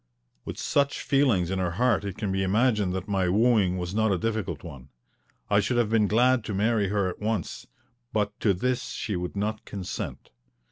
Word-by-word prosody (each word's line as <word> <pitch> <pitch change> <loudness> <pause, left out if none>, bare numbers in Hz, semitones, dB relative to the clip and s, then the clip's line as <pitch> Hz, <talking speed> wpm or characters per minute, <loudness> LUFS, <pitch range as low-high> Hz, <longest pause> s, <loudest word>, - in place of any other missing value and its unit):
With - - -6
such 140 0 0
feelings 125 - +2
in 95 - -1
her 90 -2 -1
heart 120 -3 +2
it 100 -2 -5
can 105 -3 -2
be 95 0 0
imagined 105 0 +2
that 95 +1 -4
my 95 -3 +1
wooing 105 -2 +3
was 90 0 -4
not 110 0 +2
a 95 - +2
difficult 100 -6 -3
one. 70 -5 -10 0.6
I 100 - +3
should 105 +4 0
have 115 -3 +1
been 110 -2 +3
glad 120 +3 +3
to 105 - -3
marry 105 0 +2
her 100 -1 0
at 90 - -5
once, 105 -5 -3 0.4
but 105 -2 0
to 100 -4 +2
this 125 +6 -1
she 105 -3 -3
would 90 +2 -4
not 105 +2 -2
consent. 95 -3 -6
105 Hz, 195 wpm, -26 LUFS, 95-115 Hz, 0.6 s, wooing